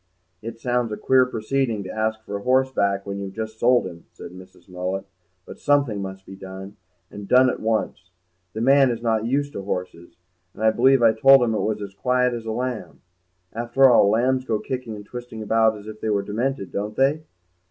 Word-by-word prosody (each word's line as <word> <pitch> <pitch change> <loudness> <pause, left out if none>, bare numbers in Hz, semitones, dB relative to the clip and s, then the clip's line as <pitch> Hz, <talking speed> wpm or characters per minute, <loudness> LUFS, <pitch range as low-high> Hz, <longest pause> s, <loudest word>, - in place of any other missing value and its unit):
"It 115 +1 -7
sounds 120 -1 -1
a 105 - -4
queer 130 -1 +3
proceeding 115 -1 -2
to 95 - -7
ask 110 0 -2
for 100 - -6
a - - -9
horse 130 +3 +2
back 100 -4 0
when 100 0 -5
you've 95 -1 -7
just 110 0 -6
sold 125 -1 +3
him," 85 -2 -9
said - - -10
Mrs. 95 +1 -15
Mullet, 90 +1 -4 0.4
"but - - -11
something 140 -8 +1
must 95 0 -7
be 95 - -10
done, 95 +1 -10 0.4
and 100 -1 -9
done 130 +2 +5
at - - -6
once. 110 -4 -2 0.4
The 110 - -4
man 135 +2 +5
is 115 -1 -4
not 110 -1 0
used 145 +3 -1
to - - -5
horses, 90 -3 -6 0.4
and 110 - -6
I 110 - +5
believe 130 +2 +3
I 115 -1 +6
told 135 +3 +6
him 115 -2 0
it 110 - -1
was 105 -1 -2
as 100 -1 -8
quiet 125 +5 +1
as 115 -1 -6
a - - -2
lamb. 125 0 -5 0.5
After 120 +4 +3
all, 100 -4 +5
lambs 130 +4 +1
go 115 -4 -1
kicking 125 -3 -5
and 105 -1 -10
twisting 120 -1 -8
about 110 0 +2
as 105 - -13
if 110 0 -10
they 110 - -2
were 100 -1 0
demented, 110 0 -3
don't 105 +2 -4
they?" 140 +4 +2
110 Hz, 215 wpm, -23 LUFS, 100-125 Hz, 0.5 s, I